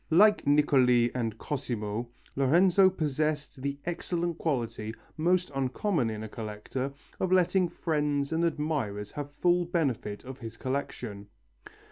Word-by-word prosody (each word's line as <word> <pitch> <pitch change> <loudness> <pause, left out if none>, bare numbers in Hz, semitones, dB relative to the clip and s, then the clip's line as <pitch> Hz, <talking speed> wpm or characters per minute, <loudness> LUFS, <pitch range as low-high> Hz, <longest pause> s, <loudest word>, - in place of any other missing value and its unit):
Like 205 +1 +5
Niccoli 130 -5 +4
and 115 -3 -2
Cosimo, 115 -4 -3 0.3
Lorenzo 180 +8 +5
possessed 150 -4 -2
the 140 +1 -2
excellent 175 -1 -2
quality, 115 -7 -2 0.2
most 180 +2 +1
uncommon 135 - 0
in 110 0 -4
a - - -5
collector, 110 +5 -4 0.3
of 185 - 0
letting 185 0 +3
friends 150 -4 -1
and 165 +1 +1
admirers 145 -11 -1
have 145 -1 -5
full 175 0 +4
benefit 140 - -1
of 130 +1 -8
his 115 -2 -8
collection. 120 -6 -4
140 Hz, 125 wpm, -29 LUFS, 120-170 Hz, 0.3 s, Like